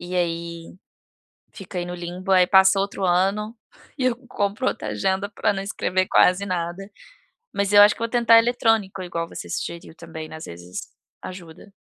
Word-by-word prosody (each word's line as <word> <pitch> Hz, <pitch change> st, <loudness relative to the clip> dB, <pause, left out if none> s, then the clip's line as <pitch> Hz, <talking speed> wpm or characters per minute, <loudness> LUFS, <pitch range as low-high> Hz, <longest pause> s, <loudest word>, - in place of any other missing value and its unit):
e 175 Hz, +1 st, -7 dB
aí 170 Hz, -1 st, -3 dB, 0.8 s
fica 185 Hz, -3 st, -6 dB
no 175 Hz, 0 st, -6 dB
limbo. 180 Hz, +2 st, -6 dB
Aí 185 Hz, -1 st, +6 dB
passa 190 Hz, +1 st, +5 dB
outro 200 Hz, 0 st, -3 dB
ano, 195 Hz, +5 st, +1 dB, 0.4 s
e 260 Hz, -, -1 dB
eu 250 Hz, -2 st, +2 dB
compro 205 Hz, +3 st, -1 dB
outra -, -, -4 dB
agenda 195 Hz, +1 st, -1 dB
pra -, -, 0 dB
não 195 Hz, -1 st, -4 dB
escrever 185 Hz, -1 st, -1 dB
quase 185 Hz, +2 st, +4 dB
nada. 180 Hz, +1 st, -4 dB, 0.7 s
Mas 200 Hz, 0 st, -1 dB
eu 205 Hz, -, +9 dB
acho 205 Hz, 0 st, +6 dB
que -, -, -17 dB
vou 230 Hz, -, -1 dB
tentar 230 Hz, -1 st, +5 dB
eletrônico 225 Hz, -5 st, +1 dB
igual 170 Hz, -2 st, -4 dB
você -, -, -9 dB
sugeriu 170 Hz, -1 st, -5 dB
também, 160 Hz, -2 st, -9 dB
às 160 Hz, -, -8 dB
vezes 85 Hz, +1 st, -8 dB, 0.4 s
ajuda. 180 Hz, +2 st, -11 dB
190 Hz, 165 wpm, -23 LUFS, 175-200 Hz, 0.8 s, eu